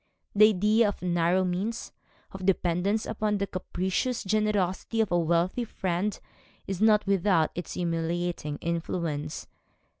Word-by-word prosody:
The 215 +1 +7
idea 215 +3 +3
of 205 - -4
narrow 175 +1 +2
means, 195 +6 -3 0.4
of 190 -1 -8
dependence 185 +3 +1
upon 215 -1 -1
the 200 - 0
capricious 190 +6 -2
generosity 210 +1 0
of 220 -4 +1
a 175 - +3
wealthy 170 +7 +1
friend 190 -2 -2 0.5
is 195 0 -4
not 215 -1 +5
without 190 -4 +2
its 175 -2 -6
humiliating 170 -2 -2
influence. 165 -3 -3
185 Hz, 125 wpm, -27 LUFS, 170-210 Hz, 0.5 s, The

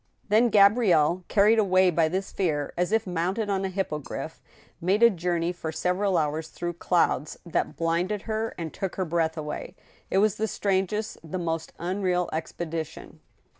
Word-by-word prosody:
Then 225 +4 +4
Gabrielle, 195 -6 +4
carried 215 +2 +4
away 185 -3 +4
by 165 -1 +3
this 190 +3 -3
fear, 150 -7 -1
as 180 +2 0
if 225 -1 +2
mounted 185 +4 -1
on 195 -1 0
a 190 - -1
hippogriff, 175 -6 -4 0.4
made 195 +6 +2
a 235 - +8
journey 175 -2 -1
for 170 -3 -5
several 180 +4 0
hours 155 0 -1
through 175 +1 -5
clouds 170 -3 0
that 170 - -1
blinded 175 +5 0
her 220 0 -3
and 165 -2 -5
took 195 -2 -4
her 190 - -1
breath 165 -1 0
away. 150 -1 -5 0.3
It - - +1
was 210 0 +3
the 220 - 0
strangest, 200 +2 -1
the 165 +3 -5
most 165 -2 -3
unreal 180 0 -1
expedition. 160 0 -5
180 Hz, 165 wpm, -26 LUFS, 165-200 Hz, 0.4 s, a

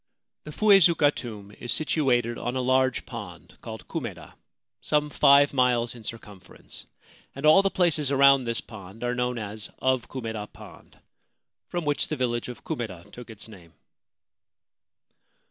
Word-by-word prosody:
The 150 - -7
Fuezuka 170 -6 +5
tomb 105 -4 -8
is 120 - -3
situated 125 -6 +1
on 120 +2 -3
a - - 0
large 130 +1 +1
pond 105 -8 -10
called 110 -1 -9
Kumeda, 120 - -6 0.5
some 150 0 0
five 140 0 +5
miles 125 -3 +2
in 120 -2 -12
circumference, 105 -4 -10 0.5
and 135 +2 -4
all 155 +5 +7
the 195 - +1
places 165 -7 +1
around 140 -1 +5
this 115 -1 -1
pond 105 0 -11
are 120 0 0
known 125 0 -1
as 105 -1 -5
of 130 -2 0
Kumeda 110 -5 -5
Pond, - - -15 0.7
from 175 -2 -4
which 145 -1 0
the 155 - -4
village 120 -2 -1
of 125 - -10
Kumeda 100 -5 -6
took 120 -1 -11
its 110 -1 -8
name. 90 -7 -15
125 Hz, 145 wpm, -26 LUFS, 110-140 Hz, 0.7 s, all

